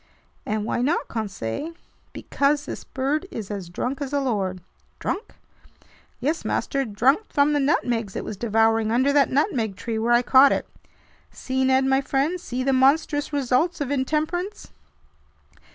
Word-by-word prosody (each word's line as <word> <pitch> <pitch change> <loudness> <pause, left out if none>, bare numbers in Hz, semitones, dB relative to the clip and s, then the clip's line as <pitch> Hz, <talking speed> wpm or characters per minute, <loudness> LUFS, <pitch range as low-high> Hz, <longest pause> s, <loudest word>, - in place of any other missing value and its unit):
"And 215 0 -1
why 235 - -1
not, 290 +7 0
Conseil?" 215 - -4 0.4
"Because 290 +1 0
this - - -6
bird 285 +7 -2
is 215 - -6
as 195 -4 -5
drunk 255 +10 -3
as 280 -1 -3
a 285 - +1
lord." 200 -9 -1 0.4
"Drunk?" 410 - -4 0.8
"Yes, 300 +6 -1
master, 275 -1 -1
drunk 255 - +1
from 285 +1 +3
the 290 - +2
nutmegs 235 -7 0
it - - -4
was - - -5
devouring 225 +1 +2
under 260 +4 +2
that 285 -1 +4
nutmeg 255 - 0
tree 220 +2 -4
where 235 +2 +2
I 240 +1 +4
caught 265 +2 +6
it. - - -3 0.6
See, 260 0 -2
Ned 265 0 +3
my 265 0 +3
friend, 285 +6 -1
see 255 -5 -3
the 270 +1 +2
monstrous 290 +3 +2
results 285 +4 +1
of 285 -2 -2
intemperance!" 310 +8 -2
265 Hz, 155 wpm, -24 LUFS, 225-290 Hz, 0.8 s, caught